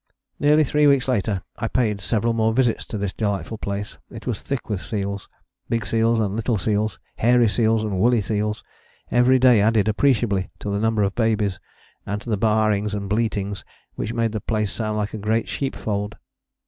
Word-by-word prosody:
Nearly 150 +1 +5
three 150 +1 +3
weeks 140 -2 +3
later 105 -6 0 0.2
I 115 - -1
paid 110 -4 0
several 115 +3 0
more 110 0 +2
visits 120 -1 +1
to 110 - -5
this 100 -2 -2
delightful 105 +1 -2
place. 100 +1 -4
It 115 -2 -10
was 120 -5 -2
thick 140 -3 -4
with 105 -4 -2
seals, 100 -3 -4 0.4
big 115 -1 0
seals 115 0 +2
and 105 -2 0
little 115 0 0
seals, 105 +2 0 0.2
hairy 120 +1 +4
seals 110 0 +2
and 100 -4 -2
woolly 120 +2 +4
seals: 105 +1 -2 0.5
every 125 +2 +5
day 125 -4 +5
added 110 0 +3
appreciably 110 -5 +2
to 100 - -4
the 100 - 0
number 110 -1 +1
of 100 0 0
babies, 110 -5 0 0.4
and 105 0 -3
to 120 - -5
the - - +3
baaings 105 -1 +1
and 100 -1 -4
bleatings 105 -2 -1 0.3
which 110 - -4
made 115 -1 0
the 110 -1 -3
place 105 -2 -1
sound 110 -2 -2
like 105 -1 -2
a 110 - -4
great 110 +2 0
sheepfold. 105 -6 -3
110 Hz, 185 wpm, -23 LUFS, 105-115 Hz, 0.5 s, Nearly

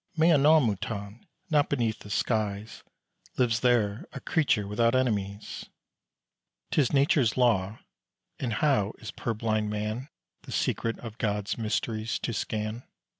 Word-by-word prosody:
Mais 160 +2 +5
à - - +4
nos 155 +2 +7
moutons. 105 -2 -3 0.3
Not 145 -2 +3
beneath 115 -5 0
the 105 - -12
skies 105 0 -1 0.6
Lives 120 -2 +2
there 115 -4 +1
a - - -5
creature 135 -9 +1
without 115 +4 +2
enemies. 105 -5 -1 1.0
'Tis 140 -5 +2
Nature's 140 -4 +3
law; 110 -4 +2 0.6
and 120 -4 -2
how 110 -5 +2
is 110 - -7
purblind 110 -2 -1
man 105 +6 -3 0.3
The - - -11
secret 115 0 0
of 115 -2 -8
Gods 105 -2 -1
mysteries 110 0 -2
to 120 - -2
scan? 110 +2 -3
110 Hz, 130 wpm, -28 LUFS, 105-125 Hz, 1.0 s, nos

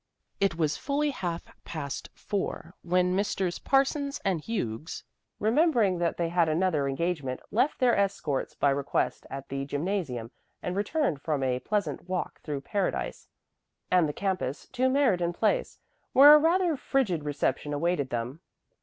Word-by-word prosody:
It 195 -4 +2
was 155 -3 0
fully 290 +1 0
half 175 -9 -3 0.2
past 140 -4 -5
four 190 -4 -4
when 180 +1 +2
Messrs. 190 -3 -1
Parsons 275 +1 +1
and 185 -5 +1
Hughes, 155 - -4 0.4
remembering 225 - +3
that 170 -1 0
they 170 -1 0
had 170 -1 +2
another 155 -3 +1
engagement, 140 -2 -2
left 250 +7 +2
their 250 -2 +4
escorts 195 -8 -1
by 140 - +3
request 140 0 -1
at 135 0 -7
the 135 0 -3
gymnasium 145 - -2 0.3
and 180 - -4
returned 205 - 0
from 150 -4 -1
a 125 -1 +1
pleasant 200 +3 -2
walk 185 -1 -3
through 145 -3 -4
Paradise 195 +6 -2 0.6
and 180 -4 +4
the - - 0
campus 185 -8 -2
to 255 0 +1
Meriden 205 -11 +2
Place, - - 0 0.4
where 285 +3 +10
a 300 - +9
rather 340 +1 +3
frigid 230 - 0
reception 145 -1 -1
awaited 145 -2 0
them. 120 +5 -3
180 Hz, 145 wpm, -28 LUFS, 145-220 Hz, 0.6 s, where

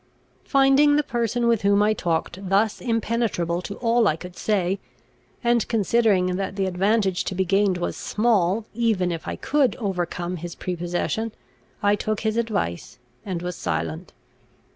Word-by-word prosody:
Finding 275 +2 +5
the 295 - +3
person 240 -2 -1
with 230 -3 +3
whom 200 +1 +4
I 215 +1 +3
talked 180 +1 -2
thus 205 +3 +2
impenetrable 225 -7 -1
to 200 +2 -6
all 230 -1 +2
I 155 - +2
could 180 +2 -10
say, 195 -2 0 0.6
and 235 -2 +2
considering 205 -4 +2
that 195 0 -3
the 195 -1 0
advantage 190 +1 +1
to 190 - -3
be 190 +1 +1
gained 195 0 +2
was 175 - -3
small, 210 -2 +1
even 215 -6 +1
if 165 -1 -5
I - - -2
could 285 -3 +1
overcome 180 -3 -3
his 170 +1 -7
prepossession, 180 +5 -2 0.5
I 205 0 +4
took 215 0 -2
his 220 0 0
advice, 215 - -2 0.3
and 180 -3 -4
was 180 -1 -3
silent. 80 - -3
200 Hz, 155 wpm, -24 LUFS, 180-230 Hz, 0.6 s, Finding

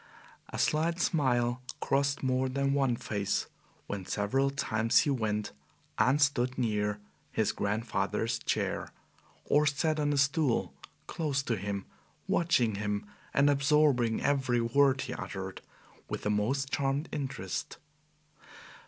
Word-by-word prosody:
A - - -6
slight 165 +3 +1
smile 125 -8 +1 0.2
crossed 140 +1 0
more 130 0 +1
than 140 +1 0
one 135 -4 +2
face 100 -3 -1 0.4
when 100 -2 -4
several 125 +9 0
times 115 -5 +2
he 145 - +1
went 105 -5 -1 0.5
and 135 +4 +4
stood 130 -3 +2
near 105 -4 0 0.3
his - - +1
grandfather's 105 +3 -1
chair, - - -2 0.5
or 150 +1 +3
sat 155 +2 +1
on 145 -1 +1
a 145 - 0
stool 140 -2 +2 0.3
close 145 -4 -1
to 120 - 0
him, 100 -1 -4 0.4
watching 130 -10 +2
him 105 0 -2 0.3
and 140 +1 +4
absorbing 140 -4 +3
every 135 -4 +2
word 130 +3 +3
he - - -4
uttered - - -6 0.5
with - - -4
the 105 - +1
most 135 +7 0
charmed 140 +3 0
interest. 135 -2 -4
135 Hz, 125 wpm, -30 LUFS, 115-140 Hz, 0.5 s, and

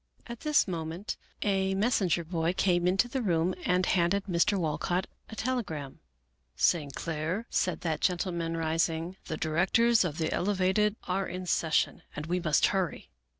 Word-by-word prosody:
At 235 -1 -8
this 300 -6 +3
moment 170 +3 -4 0.3
a 195 -2 +1
messenger 195 -5 +1
boy 165 0 -1
came 180 -2 +2
into 190 +6 +3
the 260 +1 -2
room 175 -5 +1
and - - 0
68 180 -1 -9
Melville 180 - +3
Davisson - - +1
Post 185 - +2
handed 185 +3 +2
Mr. 190 +2 +2
Walcott 175 +3 -1 0.2
a 220 - -8
telegram. 200 - -3 0.3
" 60 0 -46
St. 145 -5 +1
Clair," 165 +7 -3
said 180 - 0
that 160 -3 -2
gentleman, 170 -2 0
rising, 165 +2 -1
" - - -37
the 155 - -3
directors 205 +10 +3
of 160 -4 -3
the 160 -1 -1
Elevated 200 +2 +1
are 190 +1 -1
in 185 0 -5
ses 160 -2 0
sion, - - +1
and 150 - -4
we 180 +3 0
must 155 -4 +3
hurry." 190 -4 -1
180 Hz, 185 wpm, -29 LUFS, 165-195 Hz, 0.3 s, this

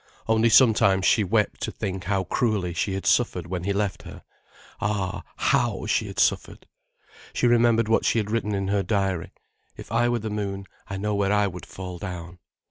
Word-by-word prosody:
Only 110 +1 +3
sometimes 105 -5 +5
she 110 - +4
wept 105 +2 0
to - - -2
think 95 -2 -5
how 95 0 0
cruelly 95 -2 -1
she 100 +2 -1
had 95 - -5
suffered 95 -8 +2
when 90 0 -4
he 100 - 0
left 100 -1 -1
her—ah, 100 -2 -6
how - - +1
she - - 0
had - - -9
suffered! - - 0 0.7
She - - 0
remembered 120 -1 +4
what 115 - +2
she - - +2
had 105 -1 -1
written 105 -2 -1
in 95 0 -2
her 100 0 +1
diary: 95 -3 -1 0.5
"If - - -11
I 120 +1 +2
were 120 - +1
the 110 -1 -5
moon, 100 -2 -4 0.2
I 95 - -4
know 105 +2 -2
where 100 -1 +1
I 105 0 +3
would 90 -2 -6
fall 90 -2 -8
down." 90 -2 -7
100 Hz, 190 wpm, -25 LUFS, 95-110 Hz, 0.7 s, sometimes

